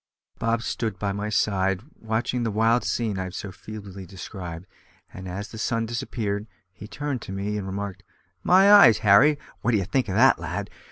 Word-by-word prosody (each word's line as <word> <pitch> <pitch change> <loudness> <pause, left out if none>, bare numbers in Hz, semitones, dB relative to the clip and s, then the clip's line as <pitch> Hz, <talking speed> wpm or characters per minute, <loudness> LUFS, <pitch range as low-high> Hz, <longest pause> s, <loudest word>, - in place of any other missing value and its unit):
Bob 115 0 0
stood 110 -4 -3
by 100 -1 -2
my 100 +2 -3
side 95 -2 +1 0.2
watching 115 +3 -1
the 115 - 0
wild 115 +3 +2
scene 110 -5 -1
I 95 - -2
have 90 - -8
so 100 - -6
feebly 100 -1 -9
described, 90 -2 -8 0.5
and 95 0 -8
as 100 +3 -5
the 110 - -9
sun 115 0 0
disappeared, 110 -3 -3 0.3
he 105 - -11
turned 140 0 -4
to - - -8
me 100 +2 -3
and 100 -2 -4
remarked: 95 -1 -5 0.4
"My 195 - +6
eyes, 125 - +8
Harry! 130 +10 +6 0.2
what 120 - +1
d'ye 100 -3 +2
think 120 +4 -1
of 95 - -2
that, 130 +5 +5
lad? - - -5
105 Hz, 185 wpm, -25 LUFS, 95-115 Hz, 0.5 s, eyes